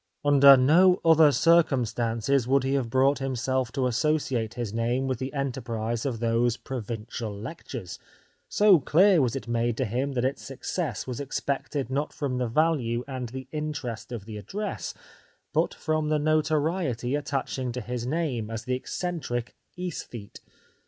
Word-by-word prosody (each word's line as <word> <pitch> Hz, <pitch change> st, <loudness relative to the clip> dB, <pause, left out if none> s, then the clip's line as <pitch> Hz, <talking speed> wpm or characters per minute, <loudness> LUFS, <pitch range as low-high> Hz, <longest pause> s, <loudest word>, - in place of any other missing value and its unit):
Under 140 Hz, -1 st, +8 dB
no 180 Hz, +8 st, +5 dB
other 160 Hz, -2 st, +7 dB
circumstances 130 Hz, -6 st, +2 dB
would 135 Hz, 0 st, +3 dB
he 135 Hz, +1 st, 0 dB
have 130 Hz, -4 st, 0 dB
brought 135 Hz, +3 st, +3 dB
himself 130 Hz, -1 st, -1 dB
to 130 Hz, -, 0 dB
associate 125 Hz, -3 st, 0 dB
his 120 Hz, -4 st, -4 dB
name 120 Hz, +3 st, 0 dB
with 130 Hz, -3 st, -2 dB
the 130 Hz, +1 st, -4 dB
enterprise 120 Hz, -4 st, -3 dB
of 120 Hz, -4 st, -3 dB
those 115 Hz, +1 st, +1 dB
provincial 115 Hz, -2 st, -5 dB
lectures, 110 Hz, -, -7 dB, 0.5 s
so 205 Hz, -4 st, +5 dB
clear 175 Hz, +5 st, +4 dB
was 125 Hz, -2 st, 0 dB
it 135 Hz, -, -5 dB
made 120 Hz, 0 st, 0 dB
to 130 Hz, -, 0 dB
him 130 Hz, +6 st, -2 dB
that 125 Hz, -1 st, 0 dB
its 135 Hz, +2 st, -1 dB
success 150 Hz, +4 st, -4 dB
was 125 Hz, -2 st, -5 dB
expected 140 Hz, -1 st, -3 dB
not 145 Hz, +3 st, -1 dB
from 130 Hz, -4 st, -2 dB
the 125 Hz, -, 0 dB
value 120 Hz, -3 st, +1 dB
and 130 Hz, -3 st, -5 dB
the 130 Hz, +1 st, -7 dB
interest 150 Hz, -7 st, -4 dB
of 115 Hz, -5 st, -6 dB
the 110 Hz, -1 st, -7 dB
address, 200 Hz, -, -5 dB, 0.6 s
but -, -, +2 dB
from 155 Hz, -1 st, -1 dB
the 155 Hz, -, +2 dB
notoriety 155 Hz, -4 st, 0 dB
attaching 140 Hz, -3 st, -2 dB
to 125 Hz, -, -4 dB
his 120 Hz, 0 st, -4 dB
name 130 Hz, -6 st, -2 dB
as 115 Hz, 0 st, -5 dB
the 125 Hz, -, -2 dB
eccentric 125 Hz, -4 st, -3 dB
" -, -, -44 dB
aesthete." 150 Hz, -, -6 dB
130 Hz, 160 wpm, -27 LUFS, 120-150 Hz, 0.6 s, Under